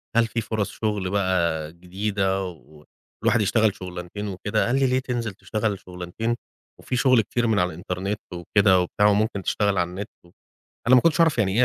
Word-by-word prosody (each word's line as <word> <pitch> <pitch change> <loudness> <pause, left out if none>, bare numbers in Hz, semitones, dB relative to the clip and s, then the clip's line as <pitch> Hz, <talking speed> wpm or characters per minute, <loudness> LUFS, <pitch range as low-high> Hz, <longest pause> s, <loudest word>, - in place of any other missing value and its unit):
"هل 115 0 +4
فيه 115 +1 -2
فرص 110 -1 -2
شُغل 105 -4 -2
بقى 85 -6 0
جديدة 95 +2 -1
و 75 -3 -13 0.4
والواحد 120 - +3
يشتغل 105 0 +2
شُغلانتين 90 +2 -6
وكده." 105 +2 -1
قال 120 - +1
لي: 135 - +3
"ليه 130 +1 +2
تنزل 120 -5 -3
تشتغل 100 +2 -2
شُغلانتين 90 +6 -4 0.4
وفيه 125 - -3
شغل 130 -2 +4
كتير 120 +3 -1
من 110 -2 +2
على 90 - +2
الإنترنت 95 +4 -3
وكده،" 95 +2 +3
وبتاع، 100 +3 +2
وممكن 105 -1 +1
تشتغل 100 +2 +1
على 85 -1 +1
النت. 100 +4 -6 0.8
أنا 130 - +6
ما 125 - +8
كنتش 165 +3 +2
أعرف 160 -6 +4
يعني 100 -4 +2
إيه 125 - +6
100 Hz, 180 wpm, -24 LUFS, 90-110 Hz, 0.8 s, ما